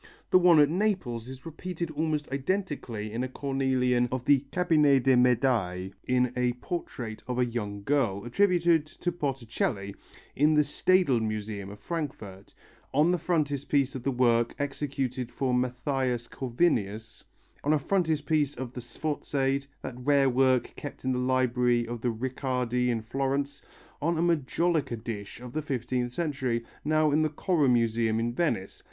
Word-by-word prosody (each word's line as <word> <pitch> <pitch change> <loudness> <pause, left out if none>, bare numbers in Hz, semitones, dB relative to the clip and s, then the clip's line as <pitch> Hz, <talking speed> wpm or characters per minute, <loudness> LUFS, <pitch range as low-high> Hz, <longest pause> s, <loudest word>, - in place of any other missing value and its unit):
The 185 - +7
one 175 -3 +6
at 145 - +7
Naples 160 - -1
is 130 +2 -10
repeated 170 +1 -5
almost 155 -1 -1
identically 135 - -2
in 115 +3 -2
a 130 - -3
cornelian 130 -2 +1
of 130 -1 -3
the 140 -1 +5
Cabinet 150 -7 +3
des 135 0 +5
Medailles, 115 -7 +2 0.2
in 125 -1 +2
a 125 -1 +1
portrait 125 -5 -5
of 125 -1 -2
a 125 - +3
young 105 -4 -4
girl, 115 -7 0
attributed 170 +1 +3
to 175 +3 -3
Botticelli, 115 - -2 0.4
in 150 +3 +4
the 150 - +5
Staedel 150 -2 +2
Museum 105 -2 -3
of 100 - -9
Frankfurt; 110 - -6 0.4
on 150 +5 +4
the 180 - +1
frontispiece 145 -4 0
of 130 0 -5
a - - +4
work 120 -2 +2
executed 135 -3 -3
for 130 -2 -1
Mathias 125 -1 -1
Corvinus; 115 - -1 0.4
on 145 - +2
a 155 - +5
frontispiece 155 -3 +1
of 125 -1 -6
the 125 - -6
Sforziade, 135 +1 -2 0.2
that - - -5
rare 140 0 +3
work 130 0 +2
kept 145 -3 -8
in 130 - +1
the 125 - 0
library 125 -2 +2
of 120 -1 -5
the 125 - +1
Riccardi 125 0 -1
in 115 -2 -1
Florence; 135 +3 -2 0.4
on 165 +3 +1
a - - +1
majolica 165 -3 +1
dish 110 -2 -6
of 125 0 -9
the 155 - -1
fifteenth 125 -3 -2
century, 130 -6 -2 0.2
now 155 0 +2
in 150 +2 +3
the 155 - +2
Correr 150 -2 +1
Museum 115 -2 +2
in 120 +1 -1
Venice. 120 - -1
130 Hz, 155 wpm, -28 LUFS, 120-150 Hz, 0.4 s, The